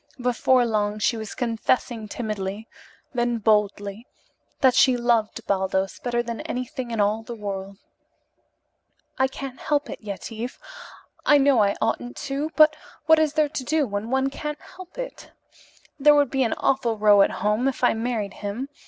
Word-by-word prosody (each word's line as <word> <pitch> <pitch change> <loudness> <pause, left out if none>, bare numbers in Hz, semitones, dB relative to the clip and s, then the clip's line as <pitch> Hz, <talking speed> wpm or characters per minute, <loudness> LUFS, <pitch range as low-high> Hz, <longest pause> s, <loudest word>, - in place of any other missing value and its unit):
Before 250 0 +2
long 210 -2 0
she 215 +2 +1
was 220 -2 -6
confessing 230 -1 -1
timidly, 210 -1 -4 0.5
then 240 -1 0
boldly, 210 0 0 0.5
that 260 -2 +5
she 260 -1 +5
loved 235 -3 0
Baldos 190 0 -1
better 240 -1 -1
than 235 -1 -5
anything 250 0 -5
in 230 -2 -3
all 210 +2 +2
the 235 +1 -8
world. 195 -2 -6 1.4
"I 265 - +4
can't 265 -1 -8
help 290 -1 -1
it, - - -8
Yetive. 220 +3 -6 0.7
I 295 - +6
know 275 -4 +4
I 200 -1 +2
oughtn't 245 +2 -2
to, 280 +1 -3
but 310 0 +6 0.3
what 320 0 +6
is 310 -2 +2
there 305 -1 +2
to 270 - -4
do 305 +3 +1
when 205 0 -4
one 265 +1 +1
can't 300 +1 -5
help 370 -1 -13
it? - - -7 0.7
There 295 +1 +6
would 285 -3 +3
be 270 - 0
an 235 - +2
awful 240 -4 +1
row 205 -1 +6
at - - +5 0.2
home 215 +5 +2
if 270 - -3
I 245 - +5
married 225 -3 -2
him. 210 +7 -5
240 Hz, 165 wpm, -24 LUFS, 210-270 Hz, 1.4 s, I